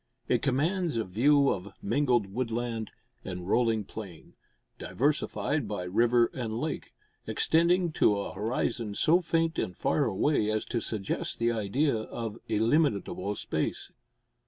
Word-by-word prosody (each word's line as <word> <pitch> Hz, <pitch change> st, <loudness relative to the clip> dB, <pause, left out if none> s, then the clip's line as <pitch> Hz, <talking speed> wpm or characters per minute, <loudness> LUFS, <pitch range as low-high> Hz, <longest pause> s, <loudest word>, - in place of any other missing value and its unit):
It -, -, +2 dB
commands 160 Hz, +3 st, 0 dB
a 115 Hz, -, +1 dB
view 140 Hz, +9 st, +3 dB
of 95 Hz, +1 st, -5 dB
mingled 120 Hz, 0 st, +2 dB
woodland 115 Hz, -2 st, -2 dB, 0.3 s
and 90 Hz, -1 st, -6 dB
rolling 115 Hz, 0 st, +2 dB
plain, 95 Hz, -5 st, -10 dB, 0.5 s
diversified 145 Hz, -1 st, 0 dB
by 100 Hz, -3 st, -3 dB
river 115 Hz, +6 st, +3 dB
and 115 Hz, -3 st, -3 dB
lake, 155 Hz, +2 st, -4 dB, 0.3 s
extending 170 Hz, +1 st, +2 dB
to 105 Hz, -8 st, +3 dB
a 100 Hz, -, -4 dB
horizon 110 Hz, +1 st, -2 dB
so 170 Hz, -, +4 dB
faint 165 Hz, 0 st, 0 dB
and 90 Hz, -, -3 dB
far 145 Hz, -, +1 dB
away 110 Hz, +2 st, +1 dB
as 110 Hz, 0 st, -1 dB
to 120 Hz, -2 st, -2 dB
suggest 105 Hz, -3 st, -3 dB
the 115 Hz, 0 st, +1 dB
idea 115 Hz, +6 st, +1 dB
of 110 Hz, 0 st, -5 dB
illimitable 110 Hz, -, +1 dB
space. -, -, -3 dB
115 Hz, 135 wpm, -29 LUFS, 105-145 Hz, 0.5 s, so